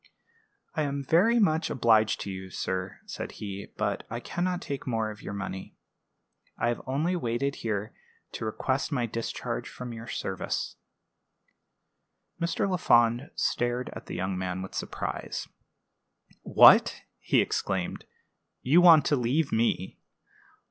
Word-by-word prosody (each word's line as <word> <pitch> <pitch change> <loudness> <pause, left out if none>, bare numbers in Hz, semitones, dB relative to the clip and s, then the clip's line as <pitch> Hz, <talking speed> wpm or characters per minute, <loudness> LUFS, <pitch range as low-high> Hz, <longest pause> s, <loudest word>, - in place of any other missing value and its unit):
"I 160 - -1
am 140 -1 -2
very 190 - +4
much 165 -7 +2
obliged 110 -3 +3
to 100 - -4
you, 95 0 -7
sir," 95 +1 -3
said - - -6
he; 100 -1 -7
"but - - -1
I 115 - -4
can 175 +7 -3
not 180 -1 0
take 140 -6 -6
more 110 -3 0
of 105 - -11
your 100 - -6
money. 95 -1 -6 0.8
I 120 - +1
have 120 - -2
only 155 +7 0
waited 140 -2 -1
here 105 -2 -3 0.4
to - - -6
request 130 +7 -1
my 125 -5 0
discharge 115 0 -4
from 125 -1 -7
your 115 0 -8
service." - - -3 1.7
Mr. 170 +3 0
Lafond 120 -8 +3
stared 120 +1 -1
at - - -10
the - - -5
young 95 +1 -2
man 90 0 -3
with 95 - -8
surprise. - - -4 0.9
"What!" - - +6 0.2
he - - +2
exclaimed; 95 -2 -1 0.6
"you 155 +7 +5
want 165 -4 +8
to 145 - +3
leave 135 +4 +1
me! 110 -5 0
120 Hz, 140 wpm, -28 LUFS, 105-145 Hz, 1.7 s, want